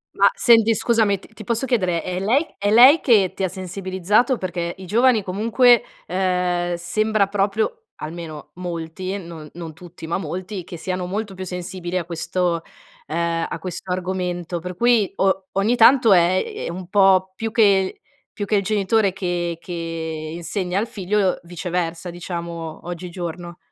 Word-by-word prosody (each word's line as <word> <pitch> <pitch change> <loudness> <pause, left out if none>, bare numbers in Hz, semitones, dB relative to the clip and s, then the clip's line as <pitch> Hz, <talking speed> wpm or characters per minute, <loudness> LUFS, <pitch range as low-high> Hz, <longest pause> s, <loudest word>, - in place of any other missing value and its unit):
Ma - - +5
senti, 230 - +5
scusami 220 -3 +2
t 195 - -18
ti 215 0 -10
posso 235 +4 -1
chiedere: 185 -9 0
è 180 0 -3
lei 240 - +2
è 205 - +1
lei 255 +8 +8
che 205 -8 +4
ti 195 - -4
ha - - +3
sensibilizzato? 190 +6 0
Perché 175 -2 -3
i 190 - -9
giovani 230 +3 +3
comunque, 230 +6 +4 0.2
ehm, 180 -1 0
sembra 215 +4 +1
proprio 210 - -1
almeno 155 -1 -8
molti, 180 +2 -5
non 165 -5 -9
non 165 -2 -7
tutti 175 0 -11
ma 165 - -1
molti, 185 +3 -5
che 175 - -8
siano 180 +2 -3
molto 205 +2 -3
più 185 0 -6
sensibili 180 0 -4
a 175 - -2
questo, 170 +1 -1 0.5
ehm, 165 +1 -1
a - - -5
questo 185 +2 -6
argomento 180 -1 -2
per 180 +2 -7
cui 235 -1 +3
o 190 -1 +1
ogni 205 +5 +2
tanto 240 -1 +6
è 180 +1 +4 0.2
è - - -3
un 180 +1 -6
po' 190 -1 +4
più 225 +2 -3
che 200 -4 +3 0.3
più 205 - -4
che 210 - +1
il 200 - +1
genitore 205 0 +1
che 175 -3 -2
che 175 - -11 0.6
insegna 180 +2 -3
al 220 +3 0
figlio, 195 -1 0
viceversa, 175 0 -4
diciamo, 170 -2 -6
oggigiorno. 175 0 -6
185 Hz, 160 wpm, -22 LUFS, 175-205 Hz, 0.6 s, lei